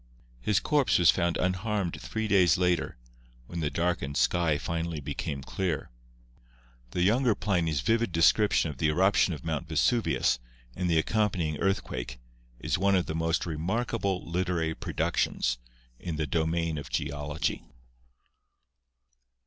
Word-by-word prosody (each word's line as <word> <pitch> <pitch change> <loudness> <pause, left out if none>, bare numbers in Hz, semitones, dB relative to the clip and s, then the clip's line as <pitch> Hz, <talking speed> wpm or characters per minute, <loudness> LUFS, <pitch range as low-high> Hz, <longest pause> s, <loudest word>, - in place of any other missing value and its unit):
His 105 - +2
corpse 145 -3 +2
was 90 - +6
found 85 -1 0
unharmed 95 0 -1
three 110 0 -3
days 95 -5 +4
later, 90 -1 0 0.5
when 85 +7 -6
the 75 -3 0
darkened 85 -5 -1
sky 85 -4 +2
finally 85 0 -3
became 70 -1 -4
clear. 85 -7 -3 1.0
The 90 +8 -1
younger 115 +3 +3
Pliny's 85 -8 0
vivid 115 - +1
description 85 +1 +3
of 70 - -12
the 80 - +2
eruption 95 +4 +3
of 75 - -12
Mount 80 0 -2
Vesuvius 80 - +2 0.4
and 90 -1 -1
the 85 - +3
accompanying 90 -4 0
earthquake 95 -9 -2 0.4
is - - -1
one 100 0 +3
of 90 -2 +2
the - - -4
most 80 +1 0
remarkable 95 +4 -2
literary 85 -2 -1
pro - - -6
ductions - - 0 0.4
in 85 -3 -4
the 80 0 -1
domain 80 +1 0
of 70 - -8
Geology. 75 +2 -2
85 Hz, 135 wpm, -28 LUFS, 80-95 Hz, 1.0 s, was